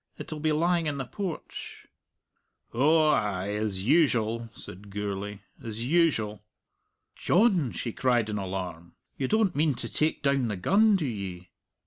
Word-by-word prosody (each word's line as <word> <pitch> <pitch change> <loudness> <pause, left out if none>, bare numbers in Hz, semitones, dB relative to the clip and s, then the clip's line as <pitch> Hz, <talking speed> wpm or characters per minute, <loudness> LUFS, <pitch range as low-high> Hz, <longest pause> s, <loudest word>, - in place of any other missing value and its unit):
It'll 155 - -6
be 155 +1 +1
lying 170 +1 +2
in 145 -1 -1
the 135 - -3
porch." 180 +3 -6 0.9
"Oh, 155 +5 +4
ay, 100 -7 0
as 105 -2 -2
usual," 115 -6 +2
said 100 +3 -9
Gourlay 100 0 -4 0.2
"as 115 0 -4
usual." 130 - +2 0.7
"John!" 180 - +3
she 115 - -4
cried 120 -4 +2
in 105 -1 -2
alarm, 90 -3 -5 0.2
"you 135 - -2
don't 220 -3 +2
mean 150 -1 +2
to 120 - -4
take 155 +6 0
down 140 -3 +2
the 105 -3 -3
gun, 205 - +4
do 175 -6 0
ye?" 95 -7 -5
120 Hz, 145 wpm, -28 LUFS, 105-155 Hz, 0.9 s, Oh